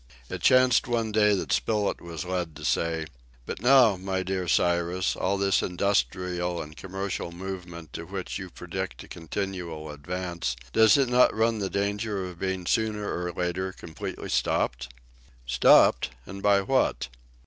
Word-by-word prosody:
It - - -4
chanced 130 -2 +5
one 115 -2 0
day 105 -1 +4
that 95 - -3
Spilett 105 -2 0
was 85 -2 -6
led 90 -3 -3
to - - -8
say 80 -1 0 0.4
"But - - -6
now, 125 -5 +6
my 95 0 -2
dear 95 -1 -2
Cyrus, 85 +2 +1
all 100 +2 0
this 100 0 +2
industrial 90 -2 -1
and 75 +1 -7
commercial 95 -1 -4
movement 85 -2 -7
to - - -6
which - - -5
you - - -7
predict - - -6
a - - -14
continual 85 -3 -5
advance, 85 -1 -4 0.2
does 110 +3 +6
it 135 -2 +3
not 125 +1 +4
run 110 0 +1
the 100 -2 -2
danger 100 0 -2
of 90 -1 -9
being 95 -1 -2
sooner 105 +1 0
or 90 0 -3
later 90 +2 -2
completely 80 -3 -7
stopped?" - - 0 0.5
"Stopped! 65 0 +5 0.2
And 100 +1 -8
by 100 -1 +4
what?" 130 - +1
95 Hz, 155 wpm, -27 LUFS, 85-105 Hz, 0.5 s, now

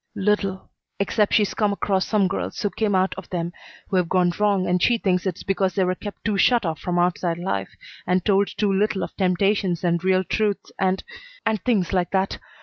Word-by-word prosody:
"Little, 195 -2 -1 0.3
except 205 +1 +1
she's 210 -2 +2
come 210 -2 +1
across 195 -1 0
some 205 -3 +2
girls 195 - -4
who 205 -3 -1
came 210 -3 0
out 185 +1 +2
of 190 - -13
them 170 -1 -3 0.4
who 190 - +1
have 180 -2 +1
gone 180 -1 +3
wrong, 200 -3 +2
and 180 0 +1
she 240 +4 +4
thinks 185 -3 0
it's 180 - -4
because 190 -1 0
they 190 - +2
were 185 0 +1
kept 205 +2 -9
too 205 -3 0
shut 240 -2 +4
off 160 -3 -2
from 175 +2 -2
outside 175 -1 +1
life, 100 - -2 0.4
and 180 0 +1
told 200 -1 +3
too 205 -2 -1
little 200 0 +1
of - - -6
temptations 190 -1 +1
and 170 -1 +1
real 185 0 +3
truths 210 +1 -1
and 190 0 +1 0.4
and 215 -4 0
things 205 -8 +1
like 180 -2 +1
that. 190 0 0
190 Hz, 210 wpm, -23 LUFS, 180-205 Hz, 0.4 s, she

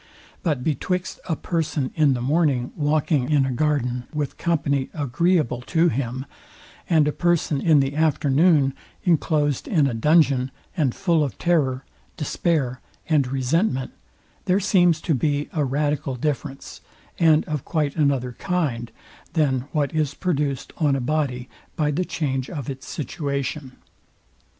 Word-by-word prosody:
But 150 -7 -1
betwixt 180 +5 -2
a 160 - +1
person 155 -5 -2
in 150 -4 +3
the 120 - -3
morning 140 -3 +1
walking 150 -2 +1
a 135 -3 +3
garden 125 -3 0
with 150 -2 -3
company, 140 -5 0
agreeable 150 -2 +1
to 170 0 +3
him; 130 0 -3 0.6
and 155 -4 +4
a - - +2
person 170 -4 +1
in 155 -4 +5
the 135 +1 -2
afternoon 150 -1 +3 0.3
inclosed 150 -5 +1
in 155 -6 +3
a 135 - 0
dungeon, 135 0 +3 0.3
and 140 -7 +1
full 170 -4 +2
of 140 - -4
terror, 140 -7 +1 0.3
despair, 145 -4 -1 0.3
and 145 -5 +3
resentment, 135 - 0 0.5
there 185 +2 +3
seems 175 -5 +3
to 165 - 0
be 145 +2 0
a 155 - +1
radical 145 +1 -1
difference, 135 +1 -4 0.4
and 160 -2 +4
of 150 -3 -3
quite 150 -4 -1
another 140 -5 +1
kind, 130 -7 -2 0.4
than 135 -6 +1
what 145 -4 0
is 150 -2 0
produced 145 -6 -2
on 150 -5 +2
a - - -1
body 130 -2 -1 0.3
by 150 -3 +1
the 180 +5 -1
change 135 -6 -2
of 140 -6 -4
its 130 -1 -9
situation. 140 -4 -4
145 Hz, 140 wpm, -23 LUFS, 135-160 Hz, 0.6 s, in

